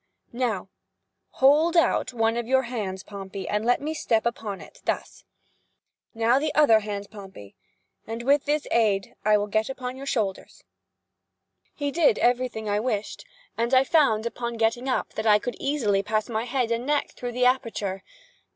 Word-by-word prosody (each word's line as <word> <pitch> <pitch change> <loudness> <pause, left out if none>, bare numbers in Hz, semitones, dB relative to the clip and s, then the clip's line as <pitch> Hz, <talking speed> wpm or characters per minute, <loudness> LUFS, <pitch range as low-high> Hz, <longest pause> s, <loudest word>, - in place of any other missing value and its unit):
Now, 235 -7 -1 0.7
hold 305 +6 +4
out 320 -5 +2
one 225 -1 +1
of 235 -1 -3
your 265 +1 +3
hands, 210 -6 -4
Pompey, 195 -1 -7
and 210 +1 -1
let 245 +2 +2
me 305 +2 -3
step 230 -7 0
upon 220 -4 -3
it—thus. - - -5 0.9
Now, 230 +3 +3
the 305 +1 -1
other 260 -8 +6
hand, 205 -1 -6
Pompey, 190 - -11 0.5
and 225 +1 -5
with 285 +2 +2
its 300 0 +1
aid 205 -4 +1
I 210 0 +4
will 205 - -1
get 215 +2 -1
upon 255 -1 -5
your 275 +1 -8
shoulders." 210 -8 -3 1.1
He 285 -1 -2
did 310 -8 +3
every 250 +1 +2
thing 220 -2 -7
I 205 0 +1
wished, 215 - -3 0.3
and 235 +3 +1
I 260 - +6
found, 270 -8 +3
upon 235 0 -4
getting 230 +3 0
up, 255 - -1
that 220 +1 -3
I 210 -1 +7
could 245 +3 -5
easily 230 -9 +1
pass 215 +3 -1
my 225 0 -2
head 245 -1 -1
and 235 +3 -1
neck 295 -1 0
through 245 -1 -6
the 250 +1 +1
aperture. 225 -6 0
235 Hz, 170 wpm, -25 LUFS, 210-260 Hz, 1.1 s, I